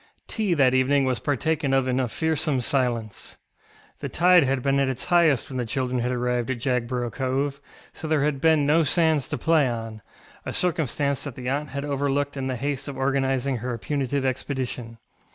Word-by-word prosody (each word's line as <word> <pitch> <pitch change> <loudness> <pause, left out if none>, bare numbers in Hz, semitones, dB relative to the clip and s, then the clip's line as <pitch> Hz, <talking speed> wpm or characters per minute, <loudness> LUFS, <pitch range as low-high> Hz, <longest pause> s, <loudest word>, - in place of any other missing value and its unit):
Tea 210 -6 0
that 130 -4 +4
evening 135 +2 +3
was 130 -2 0
partaken 145 0 0
of 135 -1 +2
in 130 0 +1
a 130 - +1
fearsome 155 +1 0
silence. 120 -5 -2 0.6
The - - -4
tide 180 0 +5
had 135 -1 0
been 140 0 +2
at 135 -1 +2
its 130 -1 -4
highest 165 -7 +3
when 130 - -6
the 125 - 0
children 125 +1 -1
had 125 +1 -1
arrived 125 -1 -1
at 130 - -1
Jagborough 125 -1 -1
Cove, 135 +3 -2 0.3
so 160 - -7
there 155 -2 +2
had 145 -2 -1
been 160 -2 +4
no 160 +3 +4
sands 160 -2 +2
to - - -3
play 160 +3 +3
onŌĆöa 115 -3 -7
circumstance 145 -5 0
that 140 -4 -6
the 125 -1 -4
aunt 145 +2 -2
had 140 +1 -4
overlooked 145 0 -1
in 135 -1 -3
the 130 - -2
haste 140 +2 -3
of 140 -2 -6
organising 135 -1 0
her 120 +1 -4
punitive 140 +4 -2
expedition. 130 -3 -3
135 Hz, 190 wpm, -25 LUFS, 125-145 Hz, 0.6 s, tide